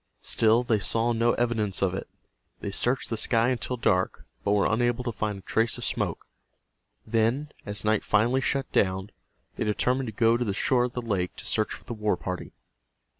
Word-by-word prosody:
Still 115 +2 +3
they 115 -3 +2
saw 115 +3 +1
no 115 +1 +2
evidence 110 -5 0
of 95 -2 +2
it. 95 - -4 0.5
They 100 - -4
searched 120 +6 0
the 115 - -1
sky 115 +2 +2
until 125 0 -2
dark, 95 -5 +1 0.2
but 100 - +2
were 100 -1 +3
unable 120 +2 +1
to 120 - -2
find 105 -2 -2
a - - -10
trace 115 +1 0
of - - -7
smoke. - - -2 0.8
Then, 115 +6 +1 0.2
as 105 +1 -4
night 110 0 +2
finally 120 +5 +2
shut 135 0 -1
down, 95 +1 +1 0.5
they - - 0
determined 125 +5 +1
to - - -3
go 115 +1 +3
to 125 - 0
the 100 -4 -2
shore 125 +3 +2
of 125 - -5
the 125 - -4
lake 95 -6 -1
to - - -9
search 110 -1 +1
for - - -15
the - - -6
war 105 -4 0
party. 90 0 -5
115 Hz, 200 wpm, -27 LUFS, 105-120 Hz, 0.8 s, Still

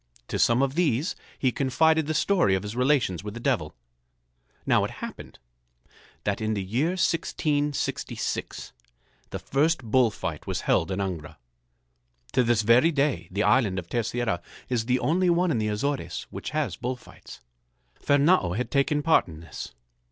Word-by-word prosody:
To - - -2
some 120 +3 +4
of 135 -1 0
these 155 - +1 0.2
he 130 - +1
confided 155 +4 +2
the 155 - -1
story 155 - +3
of 95 - -2
his 105 +2 -6
relations 125 - +1
with 105 +1 -6
the - - -5
Devil. - - -1 0.9
Now - - +3
it - - -1
happened - - -9 0.9
that 100 +1 -1
in 110 0 0
the 100 - -2
year 130 - 0
1666 150 -4 -2 0.6
the - - -4
first 150 +1 +1
bull 120 +1 +3
fight 85 -7 -6
was - - -2
held 80 - +1
in 95 - -2
Angra. 90 -6 -4 0.9
To - - +3
this 115 -2 +2
very 120 +9 +5
day 140 - 0
the 100 +3 -1
island 110 -8 +3
of 90 -3 -4
Terceira 120 -5 -1 0.3
is 120 -3 0
the 125 +1 +2
only 175 +7 +1
one 175 0 +2
in 120 - +1
the 110 - 0
Azores 135 +7 -2
which - - -5
has 150 - -2
bull 125 0 -3
fights. 125 - -14 0.6
Fernâo 145 - +3
had 125 - -3
taken 145 +1 +1
part 165 - +4
in 80 -3 -10
this. 80 - -8
125 Hz, 165 wpm, -26 LUFS, 105-150 Hz, 0.9 s, very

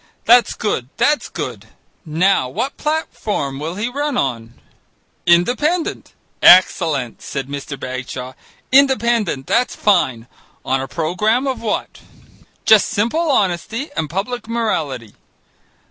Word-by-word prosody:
That's 240 +1 +5
good, 130 - -2
that's 295 0 +1
good - - -6 0.4
now 160 -3 +1
what 265 - -3
platform 215 - -3
will 160 +4 -4
he 210 +4 -2
run 285 +1 -2
on?" 120 - -2 0.7
"Independent." 250 - +1 0.3
"Excellent," 160 - +4
said 135 -1 -5
Mr. 140 -1 -6
Bagshaw. 130 0 -6 0.4
"Independent, 235 - +3
that's 250 +1 +1
fine. 130 - +1 0.4
On 135 0 0
a 135 - -5
programme 195 - 0
of 265 -2 -2
what?" 220 -2 -3 0.7
"Just 220 -2 +5
simple 235 +10 0
honesty 225 - -1
and 155 - -2
public 220 - -4
morality." 155 - -2
195 Hz, 115 wpm, -18 LUFS, -, 0.7 s, That's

